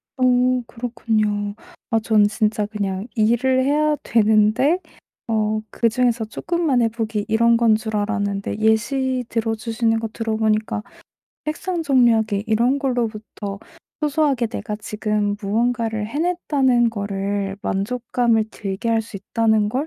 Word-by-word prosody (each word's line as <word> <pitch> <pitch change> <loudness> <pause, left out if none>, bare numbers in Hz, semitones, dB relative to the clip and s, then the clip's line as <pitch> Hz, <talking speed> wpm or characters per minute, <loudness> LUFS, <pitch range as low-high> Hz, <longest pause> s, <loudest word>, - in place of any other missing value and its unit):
어 260 - -1 0.4
그렇군요. 215 -4 -1 0.4
아 225 - +3
저는 215 -1 +3
진짜 215 0 0
그냥 200 -1 -3
일을 240 +4 +2
해야 300 +2 +2
되는데 220 - +3 0.5
어 215 -1 0
그중에서 235 0 +1
쪼끔만 305 +3 0
해 230 - +3
보기 220 -2 -3
이런 230 +1 +4
건 230 -2 +4
줄 220 0 -3
알았는데 205 -1 -1
예시 250 +4 +1
들어 225 -1 -1
주시는 225 0 0
거 225 - -3
들어 225 -1 -2
보니까 215 0 0 0.6
책상 335 +3 -2
정리하기 230 -7 +3
이런 235 +5 +2
걸로부터 220 -6 -3 0.4
소소하게 295 -5 +1
내가 215 -1 -5
지금 210 -1 -2
무언가를 225 +1 0
해냈다는 280 -5 +1
거를 200 -1 -3
만족감을 230 +2 0
들게 200 +1 -4
할 225 -1 +2
수 220 -2 -9
있다는 220 +1 +1
걸 265 +8 -2
225 Hz, 280 characters per minute, -21 LUFS, 210-245 Hz, 0.6 s, 이런